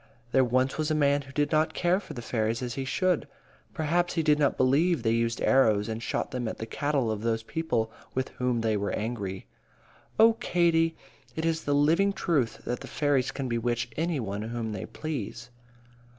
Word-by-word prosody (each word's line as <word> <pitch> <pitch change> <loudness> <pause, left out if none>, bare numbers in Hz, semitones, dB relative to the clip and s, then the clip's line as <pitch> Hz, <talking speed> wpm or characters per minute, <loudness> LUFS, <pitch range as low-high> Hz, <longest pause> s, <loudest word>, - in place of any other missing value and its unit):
There 130 - +5
once 130 +3 +1
was 155 0 0
a 155 - +1
man 145 -1 +3
who 135 -1 -12
did 145 +1 0
not 155 +1 +2
care 180 +2 +2
for - - -10
the 120 - -6
fairies 115 +1 -1
as 120 -1 -3
he 135 +1 -3
should. 180 +4 +1 0.4
Perhaps 175 +3 0
he 165 - +1
did 150 -1 +3
not 145 -2 +2
believe 145 +3 +3
they 110 - +2
used 115 0 0
arrows 110 -6 +4
and 110 0 -4
shot - - -2
them 125 -3 -3
at - - -4
the 110 - -5
cattle 140 -1 0
of 105 -1 -3
those 115 0 0
people 115 -6 -1 0.2
with 130 0 -1
whom 125 -2 -1
they 110 -1 +1
were 100 0 -1
angry. 105 -4 -3 0.7
Oh, 225 +1 +7
Katie, 170 -7 +2 0.4
it 160 - -2
is 165 -1 0
the 145 - +2
living 165 +8 +3
truth 145 - 0
that 120 - -2
the - - -9
fairies 145 -3 +1
can 135 -2 -4
bewitch 120 0 -1
any 165 -1 -1
one 100 -3 -3
whom 115 0 -4
they 100 -3 -5
please. 125 -5 -5
130 Hz, 200 wpm, -28 LUFS, 115-155 Hz, 0.7 s, Oh